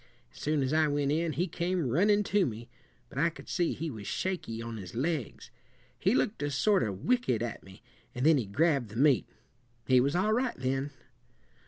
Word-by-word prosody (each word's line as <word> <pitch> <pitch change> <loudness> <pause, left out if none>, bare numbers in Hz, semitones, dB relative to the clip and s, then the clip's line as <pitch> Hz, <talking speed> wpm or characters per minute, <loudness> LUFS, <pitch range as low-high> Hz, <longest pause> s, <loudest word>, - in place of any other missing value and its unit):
As - - -14
soon 150 -1 0
as 130 +3 -1
I 155 0 +4
went 145 -1 0
in, 160 +1 0
he 175 - 0
came 175 -2 -1
runnin' 205 - +3
to 200 -3 +2
me; 115 +1 -7 0.4
but 130 - -6
I 165 +3 +4
could 165 - -13
see 175 -3 0
he 160 0 -4
was 105 -4 -8
shaky 180 -12 -3
on 115 -1 -5
his 95 -2 -9
legs. 145 -1 -3 0.5
He 195 +7 +2
looked 210 - 0
a 145 - 0
sort 195 +8 +2
of 100 -5 -3
wicked 240 - +1
at 120 - -5
me, 95 0 -15 0.3
and 125 +3 -1
then 155 -3 +6
he 115 - -3
grabbed 140 +1 +1
the 110 - -11
meat. 135 -4 +3 0.6
He 130 +2 +5
was 140 +5 +1
all 210 +4 +2
right 245 +1 0
then." 135 +2 -1
145 Hz, 205 wpm, -30 LUFS, 120-175 Hz, 0.6 s, then